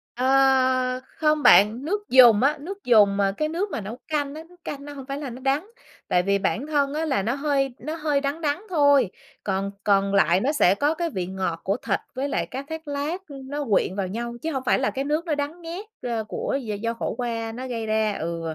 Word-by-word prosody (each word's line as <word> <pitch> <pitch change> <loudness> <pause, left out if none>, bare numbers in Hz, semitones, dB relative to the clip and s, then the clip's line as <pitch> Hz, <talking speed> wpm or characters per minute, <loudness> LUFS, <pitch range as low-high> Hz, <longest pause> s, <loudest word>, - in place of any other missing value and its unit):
Ờ, 260 -1 +3 0.2
không 305 -1 +2
bạn. 220 +7 +6
Nước 415 +4 -2
dùng 245 -4 +7
á, 295 +3 +3
nước 390 +6 -8
dùng 205 -4 +5
mà 195 -1 +2
cái 305 0 0
nước 370 +5 -2
mà 220 - -3
nấu 215 +5 -7
canh 295 -2 -2
á, 315 - -7
nước 355 -1 -21
canh 285 -3 -6
nó 290 - -8
hông 270 -2 -9
phải 275 +1 -4
là 285 -3 -5
nó 250 +2 -9
đắng, 285 +9 0 0.4
tại 180 0 +2
vì 200 +1 +2
bản 260 +8 -1
thân 285 -2 +1
á, 320 +1 -1
là 265 -10 +1
nó 235 +5 0
hơi 275 -3 0
nó 310 +1 -5
hơi 300 -3 0
đắng 285 +4 -2
đắng 300 +6 -1
thôi. 285 - +4 0.3
Còn 195 0 -1
còn 200 -1 +2
lại 180 -2 +4
nó 275 +7 +1
sẽ 195 -9 +4
có 290 +7 +1
cái 340 0 -2
vị 185 - -3
ngọt 185 -3 -3
của 200 +4 0
thịt - - -1
với 275 +2 -2
lại - - -1
cá 265 +2 -6
thác 320 +1 -8
lác, 300 +7 -3
ưm, 270 -2 -10
nó 290 0 -3
quyện 190 - +2
vào 195 -2 -1
nhau, 235 +4 -4
chứ 325 - -2
hông 265 -2 -3
phải - - +3
là 265 - +1
cái 270 - -2
nước 305 +4 -1
nó 310 - 0
đắng 295 +4 -4
nghét, 340 +5 -6 0.2
ơ, 235 -2 -2
của 245 +5 -3
d 210 -3 -5
do 230 0 -1
khổ 230 - -4
qua 230 -2 -3
nó 255 +3 -6
gây 230 -3 -3
ra. 215 -1 +1
Ừ, 170 +1 -3
270 Hz, 245 wpm, -24 LUFS, 220-300 Hz, 0.4 s, dùng